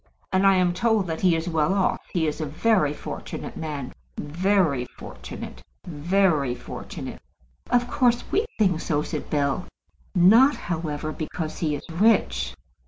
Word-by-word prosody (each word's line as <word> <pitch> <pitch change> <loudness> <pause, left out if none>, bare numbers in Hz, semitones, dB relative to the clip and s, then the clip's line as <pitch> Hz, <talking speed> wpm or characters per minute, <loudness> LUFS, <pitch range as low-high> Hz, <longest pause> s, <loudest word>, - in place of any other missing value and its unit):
"And 190 +1 +4
I 195 - +6
am 180 -1 +3
told 220 +1 +2
that 160 -2 -4
he 180 -3 +4
is 165 +1 -2
well 160 +2 +1
off. 195 - +1
He 170 -3 +1
is 155 +1 -2
a - - -1
very 170 0 +2
fortunate 150 - -7
man, 145 -5 -5 0.2
very 165 -4 +1
fortunate, 60 - -9 0.2
very 160 -4 +1
fortunate." - - -8 0.5
"Of 245 0 +2
course 245 -3 +2
we 430 +3 +1
think 185 -6 +2
so," 150 -2 0
said - - -5
Bell. 145 +3 0 0.5
"Not, 225 +11 +6
however, 155 -3 -3
because 155 +1 -5
he 155 -3 0
is 145 - -8
rich." 165 - +2
170 Hz, 150 wpm, -25 LUFS, 150-195 Hz, 0.5 s, I